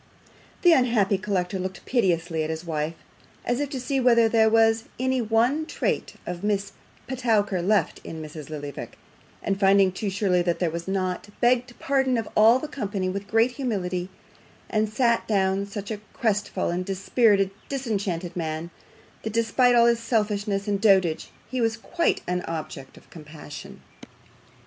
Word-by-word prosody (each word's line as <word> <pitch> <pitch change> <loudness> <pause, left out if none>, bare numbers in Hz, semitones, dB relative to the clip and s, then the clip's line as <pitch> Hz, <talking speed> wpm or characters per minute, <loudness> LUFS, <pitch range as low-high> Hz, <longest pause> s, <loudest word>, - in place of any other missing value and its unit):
The 350 -2 +7
unhappy 225 -8 +3
collector 190 -2 -1
looked 185 +1 -5
piteously 175 -8 +1
at 155 - -3
his 160 +2 -4
wife, 155 0 -2 0.5
as 245 +1 0
if 290 -1 -1
to 275 -3 -4
see 270 +2 -1
whether 235 -2 +5
there 220 -1 +4
was 225 0 +3
any 260 0 +1
one 240 +8 +1
trait - - -2
of 175 +1 -5
Miss 205 -1 0 0.3
Petowker 220 -7 0
left 205 +4 +1
in 160 - -7
Mrs. 155 -1 -8
Lillyvick, 145 -2 -7 0.5
and 195 -1 -1
finding 195 -1 +5
too 200 +2 -3
surely 190 -2 +1
that 175 -1 0
there 175 -3 0
was 170 +2 -5
not, 190 0 -2
begged 245 0 +2
pardon 265 -2 +1
of 225 - -2
all 225 +3 +7
the 305 - -5
company 205 -9 -3
with 200 +2 -4
great 225 +4 +3
humility, 190 -9 -3 0.6
and 215 -1 +1
sat 235 +1 +1
down 195 -1 +1
such 200 +1 -6
a 215 - -2 0.2
crest 210 -3 0
fallen, 175 +1 -1
dispirited, 195 +1 +2 0.2
disenchanted 200 -10 -3
man, 160 0 -4 0.5
that 220 - -5
despite 230 +2 +3
all 235 0 +6
his 235 -1 +3
selfishness 210 -3 -1
and 200 -1 0
dotage, 190 -7 +3 0.2
he 255 +1 -2
was 225 0 +1
quite 335 +9 0
an 180 0 -1
object 155 -4 -6
of - - -17
compassion. 150 -2 -10
205 Hz, 160 wpm, -25 LUFS, 180-235 Hz, 0.6 s, The